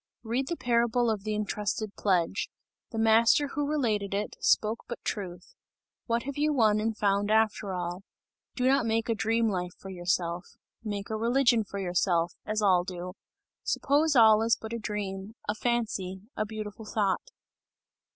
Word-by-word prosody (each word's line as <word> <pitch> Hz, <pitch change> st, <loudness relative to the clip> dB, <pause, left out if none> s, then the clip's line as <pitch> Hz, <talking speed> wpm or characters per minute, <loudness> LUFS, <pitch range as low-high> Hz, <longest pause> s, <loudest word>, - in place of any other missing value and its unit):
Read 245 Hz, +4 st, -1 dB
the 340 Hz, -, -2 dB
parable 235 Hz, 0 st, +2 dB
of 210 Hz, -3 st, -3 dB
the 215 Hz, 0 st, -2 dB
entrusted 210 Hz, 0 st, -2 dB
pledge. 185 Hz, -1 st, +1 dB, 0.4 s
The 225 Hz, -, -6 dB
Master 225 Hz, +6 st, +4 dB
who 290 Hz, 0 st, -2 dB
related 215 Hz, -10 st, 0 dB
it, 210 Hz, +1 st, -3 dB
spoke 220 Hz, +2 st, +2 dB
but 240 Hz, -, -5 dB
truth! 180 Hz, -4 st, -5 dB, 0.5 s
What 235 Hz, 0 st, 0 dB
have 280 Hz, +1 st, -5 dB
you 300 Hz, +1 st, +2 dB
won 220 Hz, -6 st, +3 dB
and 220 Hz, 0 st, -1 dB
found 200 Hz, 0 st, +1 dB
after 215 Hz, -2 st, +2 dB
all? 175 Hz, +1 st, -4 dB, 0.5 s
Do 255 Hz, 0 st, +1 dB
not 265 Hz, -3 st, +3 dB
make 225 Hz, +1 st, 0 dB
a -, -, +3 dB
dream 225 Hz, +1 st, +1 dB
life 180 Hz, -3 st, -2 dB
for 195 Hz, -, -9 dB
yourself! 175 Hz, -1 st, -2 dB, 0.3 s
Make 205 Hz, -1 st, -4 dB
a -, -, 0 dB
religion 235 Hz, +1 st, +3 dB
for 200 Hz, 0 st, -8 dB
yourself, 175 Hz, -2 st, +1 dB
as 215 Hz, 0 st, 0 dB
all 185 Hz, -3 st, +4 dB
do. 180 Hz, 0 st, -6 dB, 0.5 s
Suppose 290 Hz, +2 st, +2 dB
all 220 Hz, -2 st, +7 dB
is 230 Hz, 0 st, +3 dB
but 220 Hz, +1 st, -7 dB
a 235 Hz, -, -2 dB
dream, 205 Hz, -1 st, -4 dB
a 210 Hz, -, +1 dB
fancy, 215 Hz, -5 st, -2 dB
a 215 Hz, -, -1 dB
beautiful 215 Hz, 0 st, -7 dB
thought!" 210 Hz, -, 0 dB
215 Hz, 165 wpm, -28 LUFS, 195-230 Hz, 0.5 s, all